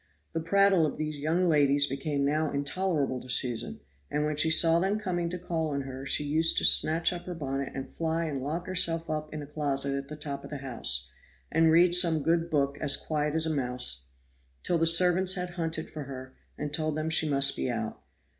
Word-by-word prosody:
The 165 - -2
prattle 195 +1 +3
of - - -6
these 155 -1 -4
young 165 +5 0
ladies 145 -3 +3
became 140 +1 -3
now 155 +2 0
intolerable 140 -2 -2
to 130 - -14
Susan, 120 -2 +1 0.3
and 150 0 -1
when 150 0 -2
she 160 +2 +3
saw 165 +1 +5
them 195 +4 0
coming 175 -5 -3
to 180 - -5
call 165 -2 -3
on 140 -1 -3
her 135 0 -8
she 150 - +3
used 160 +3 +2
to - - +3
snatch 165 +3 +4
up 175 0 -8
her 180 - -5
bonnet 135 -3 -4
and 135 0 -5
fly 165 0 -3
and 140 -4 -4
lock 160 +6 -4
herself 165 -3 0
up 155 0 -4
in 155 -1 -6
a - - -8
closet 140 -2 -3
at 140 0 -5
the 150 - -8
top 140 -2 -7
of - - -10
the 145 - -6
house, 70 - -1 0.4
and 165 +1 +3
read 175 +2 +4
some 170 -4 +3
good 165 +1 0
book 140 -2 -1
as 145 - +3
quiet 150 -1 -3
as 160 0 +3
a 160 - -1
mouse, 125 - 0 0.6
till 175 - 0
the 165 - +3
servants 180 +2 +5
had 180 -1 -4
hunted 160 -2 -4
for 150 -3 -7
her 130 -1 -9 0.2
and 150 0 -5
told 155 0 -2
them 155 +1 -3
she 160 -1 +3
must 140 -1 +3
be - - -3
out. 110 -2 -5
155 Hz, 220 wpm, -28 LUFS, 140-165 Hz, 0.6 s, saw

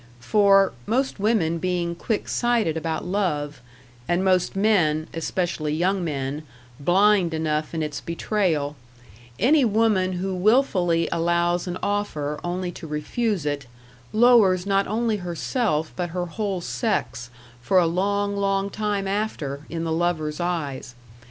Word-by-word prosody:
For, 195 - +4
most 260 0 0
women 195 -6 +1
being 175 -1 -1
quick 210 +5 -3
sighted 235 -9 +1
about 160 0 -3
love, 175 -7 -2 0.5
and 175 +2 +1
most 185 -1 +2
men 175 -7 +2
especially 165 -2 -2
young 185 +3 +1
men 140 -2 -3 0.4
blind 185 +2 +3
enough 155 -1 -1
in 160 - -1
its 150 -2 -4
betrayal, 165 -5 -1 0.6
any 280 +7 +4
woman 215 -4 +2
who 190 +2 -2
wilfully 185 -5 +2
allows 170 +1 +1
an 180 0 -3
offer 155 -8 -2
only 180 +1 -3
to 165 - -9
refuse 165 +5 -2
it, 145 -3 -2 0.4
lowers 215 -6 +5
not 195 0 +1
only 220 +1 0
herself 175 - -2
but 175 -1 -2
her 180 +1 -3
whole 195 +1 -3
sex, 125 -1 -2 0.3
for 185 +10 +2
a 180 - +5
long, 200 +4 0
long 195 0 0
time 205 -2 -2
after, 160 -9 -3
in 165 -1 -3
the 165 - -2
lover's 160 -2 -1
eyes. 150 -8 -3
180 Hz, 135 wpm, -24 LUFS, 160-200 Hz, 0.6 s, lowers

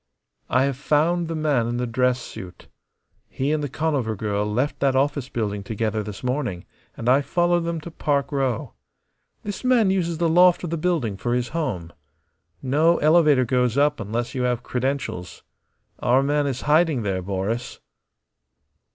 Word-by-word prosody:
"I 130 +1 +3
have 135 -2 -1
found 155 +5 +1
the 165 - -3
man 145 -7 +1
in 120 +1 -2
the 125 - -1
dress 125 +1 +1
suit." 90 -6 -10 0.6
"He 135 +2 -2
and 155 -1 0
the 145 - -2
Conover 135 -6 -1
girl 105 0 -2
left 130 +7 -1
that 135 -1 +2
office 140 -1 0
building 105 -3 -2
together 110 +1 -2
this 105 +1 -8
morning, 125 -8 -2 0.3
and 115 - -5
I 130 +3 +5
followed 175 +3 +1
them 170 -1 -2
to 170 - -9
Park 145 -2 -1
Row. 135 -5 -1 0.7
This 205 +3 -5
man 240 -6 +4
uses 170 -4 0
the 170 +1 +1
loft 175 +2 +5
of 170 - -4
the - - 0
building 155 - -1
for 120 +4 -1
his 125 -1 -1
home. 100 - -3 0.7
No 155 +6 +3
elevator 150 -4 +4
goes 125 0 +1
up 145 +1 +2
unless 115 +3 -3
you 130 - -2
have 125 -1 0
credentials. 130 -9 -3 0.6
Our 130 +3 +3
man 145 +1 +1
is 130 -2 -3
hiding 150 -4 +2
there, 95 -2 -1
Boris." 100 +6 -3
135 Hz, 170 wpm, -23 LUFS, 115-155 Hz, 0.7 s, I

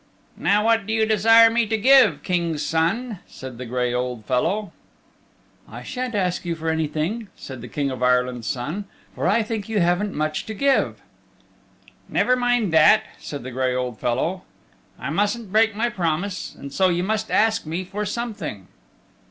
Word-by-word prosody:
"Now 210 +2 +2
what 225 -2 +2
do 220 - -1
you 220 0 +2
desire 225 +2 +6
me 230 -1 +1
to 220 +1 0
give, 265 +4 +5
King's 170 -4 -1
Son?" 195 +7 0
said 130 -2 -10
the 125 - -6
gray 125 0 -1
old 125 -3 -3
fellow. 175 - 0 1.0
"I - - -9
shan't 250 -2 -4
ask 180 -3 0
you 170 -1 -2
for 160 0 -3
anything," 160 +8 -2
said 130 -3 -9
the 125 - -8
King 140 +2 -2
of 130 -1 -6
Ireland's 125 -2 +1
Son, 150 +11 -3 0.3
"for - - -2
I 230 - +3
think 220 -1 -4
you 220 -2 +1
haven't 180 +4 +1
much 155 0 -2
to 220 - -5
give." 275 +5 +1 1.1
"Never 250 - +2
mind 245 -7 +1
that," 160 +7 +6 0.2
said 145 -4 -7
the 130 - -6
gray 130 0 0
old 125 -3 -3
fellow. 160 +10 -1 0.6
"I 140 - -5
mustn't 205 +4 -1
break 220 0 +3
my 230 +3 +1
promise, 180 +1 -2
and 140 0 -9
so 190 -1 +3
you 175 0 0
must 220 +2 -1
ask 220 -5 +2
me 170 +4 -3
for 195 +3 -4
something." 205 - -5
185 Hz, 175 wpm, -23 LUFS, 140-220 Hz, 1.1 s, desire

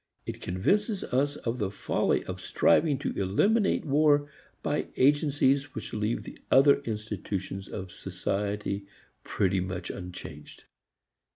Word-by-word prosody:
It - - -6
convinces 200 - 0
us 140 +3 0
of 120 -1 -3
the 100 -3 0
folly 100 - 0
of - - -6
striving 145 - +3
to - - -2
eliminate 195 - +2
war 145 0 +4 0.4
by - - -1
agencies 145 0 +3
which 110 - -6
leave 110 +2 -1 0.2
other 140 +1 +6
institutions 105 -3 -4
of 95 -2 -6
society 100 +2 -3 0.4
pretty 95 -1 +1
much 90 -1 -4
unchanged. 90 -1 -9
110 Hz, 115 wpm, -28 LUFS, 95-145 Hz, 0.4 s, other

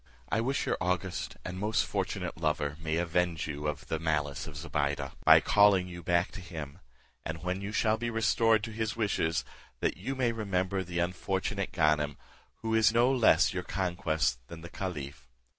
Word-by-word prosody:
I 110 - +1
wish 135 +4 0
your - - -1
august 90 0 -2
and 90 0 -5
most 105 +1 +1
fortunate 95 -3 -3
lover 75 -2 0
may 80 -1 -2
avenge 85 -1 0
you 75 0 -4
of 75 -1 -3
the 80 - -2
malice 75 -3 -1
of 75 -3 -8
Zobeide, 75 -2 -2
by - - +8
calling 100 -3 +5
you 85 -1 -8
back 85 +1 +1
to 95 - -8
him; 80 -6 -7 0.4
and 80 0 -5
when 90 +1 -2
you 100 +1 -4
shall 110 0 +2
be 120 +1 -2
restored 115 -1 +3
to 115 - -4
his 110 -1 -2
wishes, 100 -7 0 0.3
that - - 0
you 130 +9 -4
may 125 -3 +1
remember 100 -3 -1
the 90 -1 -6
unfortunate 95 +3 -1
Ganem, 75 -3 +2 0.5
who 110 0 -1
is 110 -2 +5
no 120 +3 +4
less 125 -4 +4
your - - -2
conquest 80 -8 -1
than 85 -1 -9
the 85 - -9
caliph. 70 -10 -6
90 Hz, 180 wpm, -30 LUFS, 80-105 Hz, 0.5 s, by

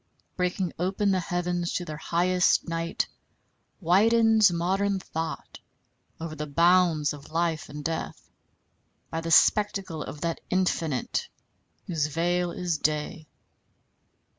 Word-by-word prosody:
Breaking 180 -1 -1
open 195 +3 +1
the 190 - +2
heavens 175 0 -2
to 175 - -2
their 155 - -6
highest, 180 +3 +2
night 165 +4 -2 0.7
widens 220 +3 +4
modern 190 +4 0
thought 165 -3 -6 0.6
over 165 -1 -5
the 150 0 -5
bounds 170 -1 +3
of 145 0 -11
life 165 -1 -1
and 150 0 -8
death 165 0 -4 0.8
by 165 - -2
the 165 - -4
spectacle 195 -2 +3
of 145 - -7
that 170 -1 -2
Infinite 165 -7 -1 0.6
whose 160 -4 -1
veil 175 +3 0
is 175 -3 -2
day. 155 +1 -2
170 Hz, 115 wpm, -27 LUFS, 160-185 Hz, 0.8 s, widens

